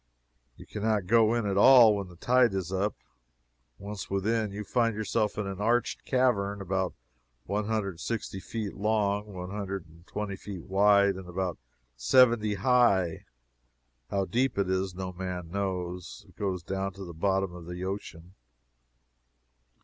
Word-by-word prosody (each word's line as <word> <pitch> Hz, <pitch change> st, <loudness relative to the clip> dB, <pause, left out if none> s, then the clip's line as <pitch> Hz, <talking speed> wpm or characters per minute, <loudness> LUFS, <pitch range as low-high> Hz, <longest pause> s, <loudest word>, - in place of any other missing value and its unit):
You -, -, -12 dB
can 105 Hz, -, -7 dB
not 105 Hz, -3 st, +1 dB
go 115 Hz, +3 st, +4 dB
in 115 Hz, -2 st, 0 dB
at 100 Hz, -1 st, 0 dB
all 120 Hz, -1 st, +8 dB
when 100 Hz, -2 st, -4 dB
the 90 Hz, -, -14 dB
tide 120 Hz, +2 st, +3 dB
is 95 Hz, -1 st, -3 dB
up. 100 Hz, +3 st, 0 dB, 0.8 s
Once 100 Hz, +1 st, -7 dB
within, 105 Hz, +2 st, 0 dB
you 105 Hz, +1 st, -5 dB
find 115 Hz, +1 st, +1 dB
yourself 105 Hz, 0 st, -1 dB
in 105 Hz, -, -1 dB
an 95 Hz, 0 st, -5 dB
arched 120 Hz, +3 st, 0 dB
cavern 105 Hz, -6 st, +1 dB
about 95 Hz, -1 st, -2 dB, 0.5 s
one 105 Hz, +1 st, -1 dB
hundred 110 Hz, -2 st, -1 dB
and 85 Hz, -3 st, -10 dB
sixty 110 Hz, -3 st, -4 dB
feet 105 Hz, 0 st, -5 dB
long, 105 Hz, 0 st, 0 dB
one 90 Hz, -1 st, -7 dB
hundred 100 Hz, -3 st, -4 dB
and 85 Hz, +2 st, -19 dB
twenty 100 Hz, -1 st, -5 dB
wide, 100 Hz, +2 st, +3 dB
and 95 Hz, -2 st, -9 dB
about 90 Hz, -1 st, -3 dB, 0.4 s
seventy 110 Hz, -, +4 dB
high. 100 Hz, -6 st, +2 dB, 0.8 s
How 100 Hz, -1 st, 0 dB
deep 125 Hz, +3 st, 0 dB
it 95 Hz, -2 st, +1 dB
is 95 Hz, -1 st, -1 dB
no 90 Hz, 0 st, -5 dB
man 90 Hz, -2 st, -5 dB
knows. 90 Hz, -2 st, -4 dB
It -, -, -21 dB
goes 95 Hz, -4 st, -2 dB
down 95 Hz, +2 st, -3 dB
to 95 Hz, 0 st, -8 dB
the 85 Hz, -, -8 dB
bottom 95 Hz, +2 st, 0 dB
of 85 Hz, -1 st, -10 dB
the 90 Hz, +1 st, -6 dB
ocean. 95 Hz, -3 st, -6 dB
100 Hz, 160 wpm, -28 LUFS, 95-105 Hz, 0.8 s, all